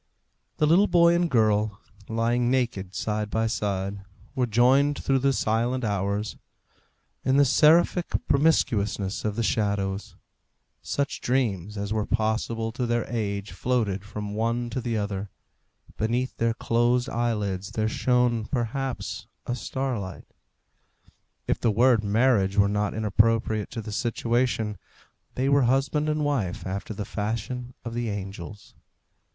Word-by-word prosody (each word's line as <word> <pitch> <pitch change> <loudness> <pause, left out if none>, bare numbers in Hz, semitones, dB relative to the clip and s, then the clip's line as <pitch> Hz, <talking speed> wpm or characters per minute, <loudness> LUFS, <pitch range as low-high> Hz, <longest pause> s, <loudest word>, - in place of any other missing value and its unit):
The 150 - +3
little 175 +7 +5
boy 170 -1 +5
and 170 0 +2
girl, 110 -4 +2 0.3
lying 120 +2 +1
naked 115 -8 -1
side 105 0 -2
by 110 +1 0
side, 100 -3 -2 0.3
were 125 -1 0
joined 130 +6 +4
through 135 -1 +1
the 135 +1 +2
silent 120 +1 0
hours, 100 0 -1 0.9
in 130 +1 +2
the 145 - +6
seraphic 165 +6 +4 0.2
promiscuousness 110 -9 +1
of 105 -1 -1
the 115 - -1
shadows; 100 -2 -1 0.7
such 140 -1 -2
dreams 105 -6 -1
as 100 +1 -2
were 110 -1 -1
possible 115 0 -1
to 125 +1 -2
their 120 -1 0
age 100 -2 -2
floated 110 -6 -1
from 105 0 -6
one 115 +2 -1
to 130 - -2
the 115 -2 -1
other; 100 -1 -3 0.7
beneath 120 +4 -1
their 115 0 +1
closed 120 +2 +1
eyelids 105 -5 -1
there 110 -1 0
shone, 120 -1 +1
perhaps, 130 +2 -3 0.2
a 120 - -2
starlight; 120 -6 -4 1.2
if - - 0
the 115 - +2
word 115 +1 +4
marriage 105 -2 +2
were 100 0 +5
not 105 0 -1
inappropriate 110 0 +1
to 115 - -6
the 105 - -6
situation, 115 -2 0 0.6
they 130 +2 0
were 140 0 +4
husband 140 +4 +1
and 150 -1 0
wife 115 -12 -1
after 95 +3 -4
the 105 -1 -4
fashion 115 +5 -4
of 115 - -4
the 120 -1 -2
angels. 100 0 -7
115 Hz, 135 wpm, -26 LUFS, 105-125 Hz, 1.2 s, the